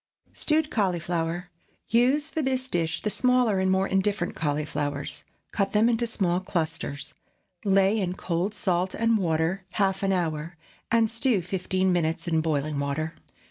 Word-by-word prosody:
STEWED 310 0 +1
CAULIFLOWER. 175 -3 -1 0.4
Use 265 +7 +3
for 320 - -1
this 260 -2 -1
dish 165 -7 -1
the 210 - 0
smaller 250 -5 +3
and 190 0 +2
more 190 +1 +2
indifferent 195 -1 0
cauliflowers. 145 -1 -2 0.3
Cut 195 -2 0
them 215 +2 +4
into 235 0 +1
small 180 -5 +1
clusters; 155 -5 -3 0.5
lay 195 +2 +3
in 180 -3 -1
cold 185 +3 -2
salt 185 -2 0
and 230 0 +2
water 165 +2 0
half 195 -2 +1
an 195 -1 +1
hour, 165 -2 -2 0.3
and 230 -1 +3
stew 230 -4 +1
fifteen 185 +1 0
minutes 165 0 0
in 160 -2 +2
boiling 150 -2 -1
water. 145 +3 -2
185 Hz, 145 wpm, -26 LUFS, 165-215 Hz, 0.5 s, them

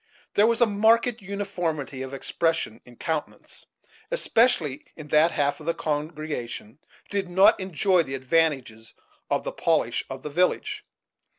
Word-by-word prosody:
There 210 +2 +5
was 235 +1 +1
a - - +8
marked 225 +3 +3
uniformity 180 -9 -3
of 130 0 -5
expression 140 -3 -1
in 125 - -15
Countenance, 155 +3 -5 0.4
especially 235 - +2
in 150 -2 -10
that 155 +3 +5
half 145 -2 0
of 155 - -11
the 170 - +1
congregation 150 -6 -4
who - - -39 0.3
did 190 -2 -4
not 190 +3 +5
enjoy 185 0 +2
the 135 -4 -4
advantages 130 -5 0 0.3
of - - 0
the - - -3
polish - - +1
of 135 0 -7
the 150 - -5
village. 180 +5 0
160 Hz, 150 wpm, -25 LUFS, 140-195 Hz, 0.4 s, a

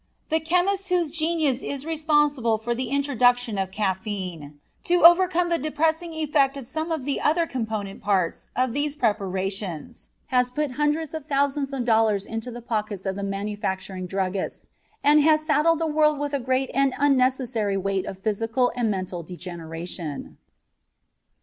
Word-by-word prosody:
The 320 - +2
chemist 365 +4 +1
whose 350 -4 +1
genius 315 -5 0
is 280 0 -4
responsible 295 -7 +2
for 235 +2 -2
the 245 0 -3
introduction 245 -5 +2
of 190 -1 -1
caffeine 190 -7 -3 0.3
to 350 -1 +2
overcome 350 0 +6
the 335 - +1
depressing 315 +3 0
effect 285 -3 +1
of 270 - -7
some 315 +6 -3
of 310 -5 -2
the 280 - -1
other 330 +3 +2
component 220 -8 -4
parts 190 -4 0
of 255 -1 +1
these 290 +1 -1
preparations 195 - -2 0.2
has 250 0 +3
put 295 +2 -2
hundreds 295 +3 0
of 315 -2 -6
thousands 280 -1 0
of 265 -3 -2
dollars 220 -4 +3
into 225 +2 -5
the 240 -1 -8
pockets 215 -4 -3
of 190 -1 -1
the 200 - -5
manufacturing 195 -2 -3
druggists 190 0 -3 0.3
and 295 +1 +6
has 310 0 +4
saddled 310 +2 +3
the 325 - -1
world 305 -1 +3
with 290 0 -3
a 280 - +1
great 260 +1 0
and 275 -1 +2
unnecessary 255 -6 +2
weight 195 0 -1
of 190 - -6
physical 225 +5 0
and 240 -3 0
mental 185 -3 -3
degeneration. 170 -2 -7
250 Hz, 155 wpm, -24 LUFS, 200-300 Hz, 0.3 s, overcome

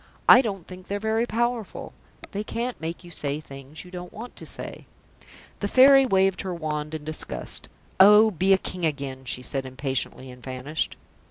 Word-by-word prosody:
I 250 - +10
don't 195 -8 -4
think 185 0 -11
they're 200 - -2
very 220 +2 0
powerful. 235 -2 -2 0.4
They 205 +1 -3
can't 235 +1 -4
make 165 +3 -5
you 175 - -12
say 145 -2 -1
things 140 +2 -11
you 180 - -13
don't 180 -1 -7
want 235 +3 -9
to - - -7
say." - - -7 0.7
The 200 - -1
Fairy 270 +3 +7
waved 190 -3 +2
her 185 -2 -4
wand 155 -1 -3
in 155 - -6
disgust. 155 +1 -5 0.3
"Oh, 210 +3 +8
be 190 +1 +1
a 195 - +7
King 185 -1 -5
again," 140 -4 -2
she 125 0 -3
said 135 +1 -3
impatiently, 130 0 -3
and 125 0 -13
vanished. 130 +5 -3
180 Hz, 180 wpm, -25 LUFS, 145-210 Hz, 0.7 s, I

